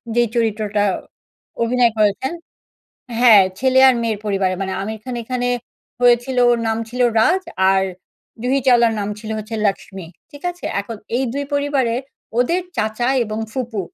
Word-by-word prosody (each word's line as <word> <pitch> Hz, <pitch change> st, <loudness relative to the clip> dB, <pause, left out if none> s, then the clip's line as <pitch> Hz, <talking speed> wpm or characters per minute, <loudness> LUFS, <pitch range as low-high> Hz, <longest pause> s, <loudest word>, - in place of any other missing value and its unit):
যেই 240 Hz, -1 st, +3 dB
চরিত্রটা 215 Hz, -3 st, 0 dB, 0.8 s
অভিনয় 240 Hz, 0 st, +3 dB
করেছেন 215 Hz, +7 st, +1 dB, 0.9 s
হ্যাঁ, 220 Hz, -5 st, +8 dB, 0.2 s
ছেলে 260 Hz, 0 st, +3 dB
আর 260 Hz, -, +4 dB
মেয়ের 220 Hz, -3 st, -1 dB
পরিবারে 195 Hz, -2 st, 0 dB
মানে 190 Hz, -, -3 dB
আমির 220 Hz, +2 st, -5 dB
খান 255 Hz, -1 st, -5 dB
এখানে 245 Hz, +1 st, -2 dB, 0.5 s
হয়েছিল 245 Hz, +1 st, +3 dB
ওর 240 Hz, -, +2 dB
নাম 225 Hz, 0 st, 0 dB
ছিল 250 Hz, +2 st, -6 dB, 0.2 s
'রাজ' 370 Hz, +12 st, +2 dB, 0.3 s
আর 190 Hz, 0 st, +2 dB, 0.6 s
জুহি 265 Hz, +2 st, +1 dB
চাওলার 235 Hz, -3 st, +5 dB
নাম 200 Hz, -, -2 dB
ছিল 220 Hz, 0 st, -8 dB
হচ্ছে 215 Hz, +1 st, -6 dB
'লাক্সমি।' 190 Hz, -3 st, -3 dB, 0.2 s
ঠিক 285 Hz, -, -13 dB
আছে? 355 Hz, 0 st, -13 dB, 0.2 s
এখন 220 Hz, +2 st, -7 dB, 0.2 s
এই 265 Hz, -, 0 dB
২ 285 Hz, +2 st, -2 dB
পরিবারের 275 Hz, -4 st, 0 dB, 0.4 s
ওদের 340 Hz, +9 st, +2 dB
চাচা 220 Hz, +2 st, -1 dB, 0.2 s
এবং 215 Hz, 0 st, -5 dB
ফুপু 240 Hz, -6 st, -3 dB
235 Hz, 150 wpm, -19 LUFS, 215-255 Hz, 0.9 s, হ্যাঁ